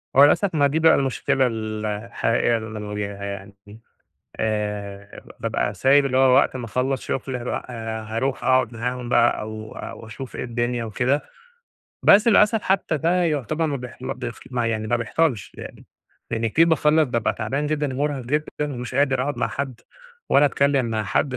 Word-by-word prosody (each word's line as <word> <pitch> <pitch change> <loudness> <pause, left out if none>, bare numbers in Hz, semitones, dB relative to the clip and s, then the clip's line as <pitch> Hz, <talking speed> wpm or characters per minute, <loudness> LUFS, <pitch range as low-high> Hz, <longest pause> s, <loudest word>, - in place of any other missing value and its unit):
هو 135 - +8
للأسف 180 +4 +2
ما 145 -1 +4
دي 150 +3 0
بقى 160 0 +6
المشكلة 135 -1 +1
ال 110 -2 -4
الحقيقة 115 +2 0
اللي 110 -1 -7
أنا - - -5
بواجهها 105 -1 -5
يعني، 100 0 -7
دي، 105 +2 -13 0.6
آآ 105 -2 -3 0.2
ببقى 105 - -1
سايب 135 +8 +4
اللي 130 -1 +1
هو 130 -1 +5
وقت - - +3
ما 125 - -4
اخلص 130 +4 -1
شغل - - -2 0.2
بأ - - -2
آآ 110 -2 -5
هاروح 115 +5 -2
أقعد 130 -2 +2
معاهم 125 +1 -4
بقى 120 - +3
أو 110 0 -7
أو 115 - -8
أشوف 130 +3 -8
إيه - - -4
الدنيا 120 0 -2
وكده، 125 +6 0 0.8
بس 210 +4 +6
للأسف 210 0 +4
حتى 190 -4 +1
ده 175 +5 +2
يعتبر 155 +1 0
مابيح 125 -5 -5
مابيح 125 -2 -4 0.2
يعني 115 -3 -1
ما 120 - +1
بيحصلش 120 - -1
يعني، - - -10 0.5
لِأَنِّي 115 0 0
كتير 165 +9 +4
باخلص 155 0 +4
بابقى 115 -2 0
تعبان 135 +7 -2
جدًا 150 -3 -1
و - - -5
مرهق 145 -1 -1
جدًا 150 +5 0 0.3
ومش 125 0 -6
قادر 135 -1 +2
أقعد 145 +2 -2
مع - - 0
حد، 130 -4 -5 0.5
ولا 145 - +5
أتكلم 140 -2 +2
مع 110 -2 -2
حد، 125 +5 0
125 Hz, 175 wpm, -23 LUFS, 110-140 Hz, 0.8 s, هو